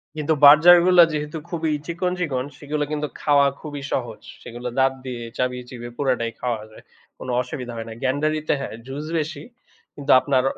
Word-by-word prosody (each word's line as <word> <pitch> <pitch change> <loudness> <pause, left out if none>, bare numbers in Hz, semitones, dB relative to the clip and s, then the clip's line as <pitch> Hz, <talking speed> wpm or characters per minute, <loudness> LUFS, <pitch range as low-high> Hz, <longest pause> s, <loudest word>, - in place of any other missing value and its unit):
কিন্তু 155 +1 0
বার্জারগুলা 175 +4 +8
যেহেতু 150 +1 -4
খুবই 165 -2 -2
চিকন, 175 +2 -2
চিকন 135 -8 -1
সেগুলা 150 0 -3
কিন্তু 150 0 -2
খাওয়া 145 -1 +4
খুবই 145 -2 -7
সহজ। 120 -4 -3 0.2
সেগুলা 120 +1 -6
দাঁত 135 0 +3
দিয়ে 125 -2 -5
চাবিয়ে-চিবিয়ে 125 -1 -4
পুরাটাই 125 -4 0
খাওয়া 120 -3 -2
যায়, - - -15 0.3
কোনো 125 - -6
অসুবিধা 125 -1 -6
হয় 115 0 -6
না। - - -7
গ্যান্ডারিতে, 155 +4 0
হ্যাঁ 120 - -6
জুস 140 +3 -6
বেশি, 155 -1 -4 0.5
কিন্তু 140 -1 -1
আপনার 130 -1 +1
140 Hz, 160 wpm, -22 LUFS, 125-155 Hz, 0.5 s, বার্জারগুলা